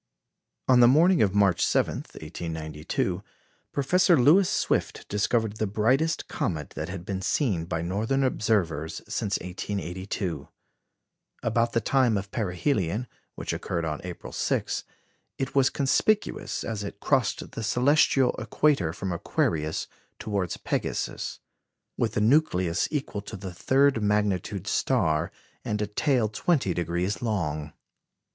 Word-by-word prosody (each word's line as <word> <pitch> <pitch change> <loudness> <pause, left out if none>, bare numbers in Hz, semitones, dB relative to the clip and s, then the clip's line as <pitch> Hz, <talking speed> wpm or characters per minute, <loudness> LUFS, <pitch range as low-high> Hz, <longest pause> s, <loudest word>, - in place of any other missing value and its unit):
On 130 -1 +6
the 120 - +8
morning 165 +7 +5
of 100 -2 +2
March 100 -4 +3
7, - - +1
1892, 80 -1 -4 0.5
Professor 175 +4 +3
Lewis 170 +9 +6
Swift - - -1
discovered 110 +1 0
the 110 - 0
brightest 130 +10 +1
comet 80 -5 -3
that 80 +2 -5
had 90 -1 -6
been 95 -1 -3
seen 95 - 0
by 85 -1 -2
northern 110 +10 0
observers 95 - 0
since 100 -1 -1
1882. 95 0 -4 1.0
About 115 +1 +1
the 115 - +2
time 125 -2 +3
of 100 0 -5
perihelion, 105 - -1 0.3
which - - -4
occurred 85 -1 -2
on 75 -2 -3
April 90 -1 -8
6, - - -1 0.5
it 135 0 -3
was 135 -1 +4
conspicuous, 200 +10 0
as 110 -2 -3
it 100 0 -7
crossed 130 -5 0
the - - -6
celestial 125 +3 +3
equator 135 - +1
from 95 +1 -4
Aquarius 80 -2 -1 0.3
towards 100 -5 -2
Pegasus, - - -3 0.6
with 110 -2 -1
a - - +2
nucleus 105 - +2
equal 135 -8 -3
to 105 - -8
a - - -5
third 135 +5 +3
magnitude 105 -3 0
star, 75 -1 +1 0.3
and 105 - -2
a 105 - +1
tail 120 +3 +1
twenty 110 - +1
degrees 90 +3 -1
long. 75 -10 -2
105 Hz, 130 wpm, -27 LUFS, 90-130 Hz, 1.0 s, the